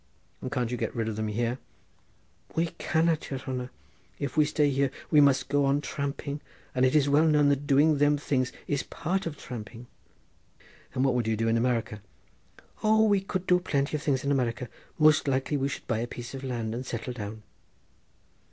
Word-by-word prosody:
"And 130 - -5
can't 125 -3 -1
you 125 - -1
get - - -3
rid 115 -2 -1
of 110 - -2
them 110 0 -2
here?" 120 +4 -1 1.0
"We 165 +1 +1
cannot, 160 -1 +1
yere 135 - -3
hanner. 130 -1 -4 0.5
If 140 -3 -4
we 155 -1 +5
stay 150 0 +2
here 135 0 +2 0.2
we 150 - +7
must 135 -2 +4
go 145 0 +2
on 140 +1 +2
tramping, 140 0 -4 0.3
and 130 0 +3
it 130 - 0
is 145 -2 +4
well 150 +3 +4
known 150 -2 +4
that 140 0 0
doing 145 +2 +4
them 145 0 +4
things 130 -3 0
is 145 -2 0
part 175 +3 -2
of 150 -3 -5
tramping." 120 0 -8 1.1
"And 130 - +2
what 135 - +3
would 120 -2 0
you 110 -1 +1
do 115 +1 0
in 115 - +3
America?" 115 -3 0 0.8
"O 220 0 +4
we 205 -3 +3
could 190 -1 -3
do 180 -1 +4
plenty 145 -4 -1
of 150 - -2
things 135 -4 0
in 140 - 0
America—most 135 +5 +1
likely 135 +2 0
we 135 -1 +1
should - - -6
buy 115 -3 -1
a 120 - -2
piece 120 +1 -8
of 135 0 -6
land 120 -4 -3
and 120 +2 -4
settle 125 0 -4
down." 110 -1 -7
135 Hz, 200 wpm, -28 LUFS, 120-150 Hz, 1.1 s, we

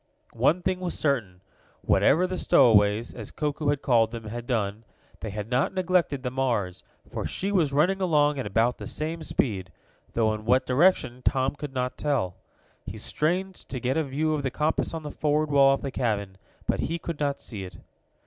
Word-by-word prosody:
One 175 +3 +2
thing 185 0 0
was 180 -1 -3
certain 110 -12 -1 0.4
whatever 170 +6 +3
the 185 0 -3
stowaways, 105 0 +4
as 110 -4 -8
Koku 150 0 -3
had 145 0 +1
called 115 -4 +4
them, 115 -1 -7
had 120 +2 -6
done, 110 -2 -1 0.4
they 110 - -5
had 105 +1 -5
not 130 +9 +1
neglected 180 -7 +1
the 125 - -2
Mars, 115 -9 -1 0.3
for - - -5
she 195 +2 -3
was 170 -8 +2
running 180 +7 +2
along 150 -5 +3
at 130 - -3
about 115 +4 +1
the - - -6
same 160 +2 -4
speed, 100 - -2 0.4
though 110 -2 +2
in 110 0 -6
what 130 +3 +3
direction 130 -3 +2
Tom 135 -1 +1
could 145 -2 -8
not 125 0 -2
tell. 125 -12 0 0.5
He - - -7
strained 185 +5 -1
to 135 -7 -8
get 125 +2 -1
a 160 - +2
view 150 +3 -1
of 150 - -1
the 135 - -1
compass 150 +5 -1
on 160 - -5
the 150 - -5
forward 150 0 0
wall 135 -1 +6
of - - -10
the 135 - -3
cabin, 100 -7 -2 0.3
but - - 0
he 165 - -1
could 170 -2 -6
not 140 -1 -1
see 105 -5 -6
it. 90 -3 -9
135 Hz, 195 wpm, -26 LUFS, 115-155 Hz, 0.5 s, wall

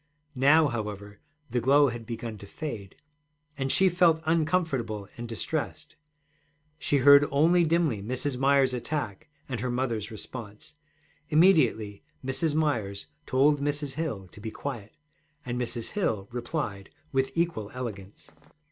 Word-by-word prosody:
Now, 145 +4 +5
however, 105 -3 -5 0.3
the 120 0 0
glow 140 +3 +5
had 120 -2 -7
begun 115 -2 -5
to 100 - -11
fade, 105 -8 -6 0.6
and 135 -1 -1
she 190 - +5
felt 170 -3 +3
uncomfortable 155 - 0
and 120 0 -6
distressed. 155 +6 -4 0.8
She 145 - +1
heard 140 +2 +7
only 165 +5 +4
dimly 160 -9 +1
Mrs. 130 +5 -2
Myers's 135 0 +3
attack 125 -5 -4 0.2
and 125 -4 -3
her 125 +3 -2
mother's 120 -4 -2
response. 110 +3 -9 0.6
Immediately 145 - +3 0.2
Mrs. 145 +3 0
Myers 115 -11 0 0.2
told 140 +2 +3
Mrs. 145 -1 -2
Hill 135 - -4
to 105 - -14
be 110 - -4
quiet, 110 -4 -7 0.5
and 125 0 -2
Mrs. 120 -1 -4
Hill 110 - -1
replied 120 -6 -4 0.2
with 135 +2 0
equal 165 -12 0
elegance. 105 -6 -7
130 Hz, 130 wpm, -28 LUFS, 110-150 Hz, 0.8 s, heard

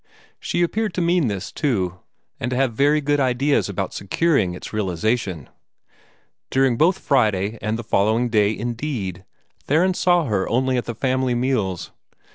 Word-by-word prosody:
She 175 - 0
appeared 210 +3 -1
to - - -1
mean 170 -4 +2
this, 100 -4 -4
too, 95 -10 -1 0.4
and 120 - -2
to 125 - -2
have 130 -3 +1
very 145 +5 +3
good 145 0 +1
ideas 135 0 +1
about 95 -1 -3
securing 105 - +1
its 90 - -9
realization. 100 - -1 1.0
During 130 -2 +2
both 170 +9 +3
Friday 110 -5 +1
and 110 +2 -1
the 120 - -6
following 110 +3 +2
day, 105 -1 +2
indeed, 115 - -4 0.4
Theron 175 +6 +3
saw 175 -2 +2
her 105 -6 -1
only 130 +2 +1
at 125 - -1
the 120 - -5
family 130 0 0
meals. 120 -8 -1
120 Hz, 155 wpm, -22 LUFS, 105-140 Hz, 1.0 s, very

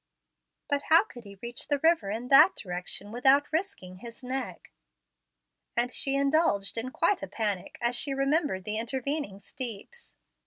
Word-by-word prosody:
"But 285 -1 0
how 325 +4 +7
could 245 - -14
he 200 -1 -12
reach 235 0 -3
the 290 - +1
river 320 -7 +2
in 230 +4 -5
that 300 +7 +7
direction 180 +2 -4
without 270 +5 +2
risking 315 - -4
his 235 +5 -11
neck?" 255 -8 -5 1.1
and 245 +1 +1
she 275 0 +2
indulged 275 -8 +1
hi 255 - -6
quite 345 +8 0
a - - -5
panic 205 -5 -3
as 240 +1 +1
she 275 +3 +5
remembered 275 - 0
the 215 +2 -3
intervening 260 -2 -3
steeps. 255 - -6
255 Hz, 155 wpm, -28 LUFS, 210-290 Hz, 1.1 s, how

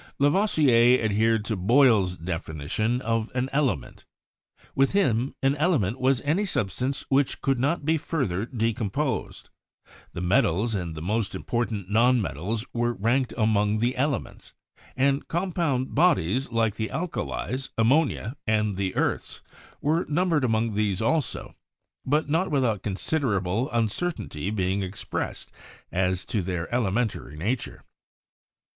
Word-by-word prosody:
Lavoisier 140 - +4
adhered 110 +1 +2
to 110 - -1
Boyle's 105 -3 +4
definition 85 - -2
of 115 0 0
an 130 +1 -1
element. 130 - -1 0.7
With 135 +4 +2
him, 130 - +1
an 135 +1 +3
element 135 - +1
was 130 -1 +2
any 160 +8 +1
substance 130 - -2
which 135 0 +2
could 135 -2 0
not 145 +3 0
be 160 +1 +3
further 115 - -2
decomposed. 115 +3 -2 0.6
The 85 - -5
metals 105 +2 +2
and 90 -5 -3
the 80 - -6
most 105 +3 -1
impor 120 0 -2
tant 100 -4 -5
non 120 +3 +4
metals 105 - -3
were 120 0 0
ranked 120 +6 0
among 110 -1 +2
the 120 +3 0
elements; 140 -1 -3 0.4
and 140 +1 +1
compound 165 -7 -1
bodies 135 - +2
like 115 -2 +1
the 110 -1 -2
alkalies, 130 - -3
ammonia 125 0 +2
and 105 -3 +1
the 95 -1 -2
earths - - -2 0.4
were 160 +4 +1
numbered 165 -2 +1
among 115 -2 +1
these 100 -3 0
also, 150 +4 -1 0.5
but 150 +3 +2
not 165 +6 +1
without 125 -9 +1
consid 105 +11 -1
erable 105 0 0
uncertainty 115 - -2
being 95 -1 0
expressed 95 +1 -5 0.4
as 90 0 0
to 105 - -1
their 90 +1 -4
elementary 110 - -1
nature. 115 +10 -3
115 Hz, 130 wpm, -26 LUFS, 100-135 Hz, 0.7 s, Lavoisier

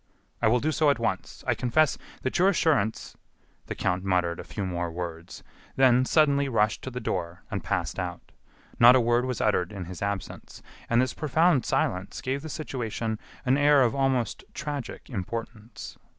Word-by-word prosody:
"I - - +4
will 120 +3 +4
do 155 +5 0
so 155 -1 +3
at 140 - +3
once....I - - -2
confess 140 +4 +2 0.3
that 130 - -1
your 190 +2 +5
assurance 145 - 0 0.3
" - - -39
The - - -4
count 90 +1 -1
muttered 90 -3 0
a - - -5
few 100 - -5
more 90 -2 -3
words; 85 0 -7 0.3
then 130 -1 +5
suddenly 140 -2 +3
rushed 110 -3 +1
to - - -5
the 125 -1 -5
door 85 -6 -4
and 100 -5 -3
passed 85 0 -2
out. 90 -1 -6 0.5
Not 120 +2 +9
a - - +5
word 120 +1 +2
was 125 -2 -3
uttered 90 -4 +1
in 95 -3 -6
his 90 0 -9
absence; 100 -1 -5 0.3
and 115 - +3
this 130 +1 +1
profound 155 -2 +2
silence 90 +2 -1
gave 135 +2 -2
the 160 - -7
situation 115 -7 -4 0.3
an 130 +2 +3
air 145 -1 +5
of 120 - +2
almost 135 -3 0
tragic 145 -4 -5
importance. 115 +1 -6
120 Hz, 180 wpm, -27 LUFS, 95-135 Hz, 0.5 s, Not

